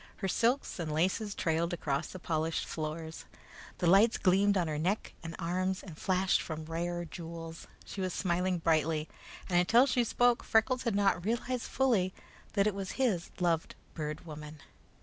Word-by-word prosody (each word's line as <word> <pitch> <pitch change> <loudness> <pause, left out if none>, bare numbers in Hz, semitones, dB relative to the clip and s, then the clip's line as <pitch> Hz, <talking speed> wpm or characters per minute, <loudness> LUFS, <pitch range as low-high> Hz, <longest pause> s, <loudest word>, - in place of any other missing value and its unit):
Her 195 - -3
silks 235 +4 +1
and 160 -3 -2
laces 190 +6 0
trailed 165 +2 0
across 140 -5 -1
the - - -8
polished 160 -2 -1
floors. 160 +1 -5 0.5
The 180 - -1
lights 200 +7 +6
gleamed 200 +1 +3
on 175 -3 +1
her 150 -1 -2
neck 190 +7 -1
and 165 -1 -6
arms, 185 +2 -1
and 175 -5 -9
flashed 185 +2 +2
from 160 -1 -5
rare 175 +2 -3
jewels. 165 -1 -8 0.2
She 195 - -6
was 185 -1 -1
smiling 180 0 0
brightly; 160 -1 +1 0.4
and 175 -2 +3
until 230 +8 +5
she 250 -2 +2
spoke, 245 +1 +2
Freckles 250 +3 +2
had 230 -4 +1
not 195 -3 +2
realized 235 +3 -2
fully 225 -9 +2 0.4
that 200 -2 +3
it 215 - +2
was 195 -1 -4
his 225 -10 0
loved 170 -3 0 0.2
Bird 155 0 -5
Woman. 150 -1 -9
180 Hz, 170 wpm, -31 LUFS, 165-200 Hz, 0.5 s, lights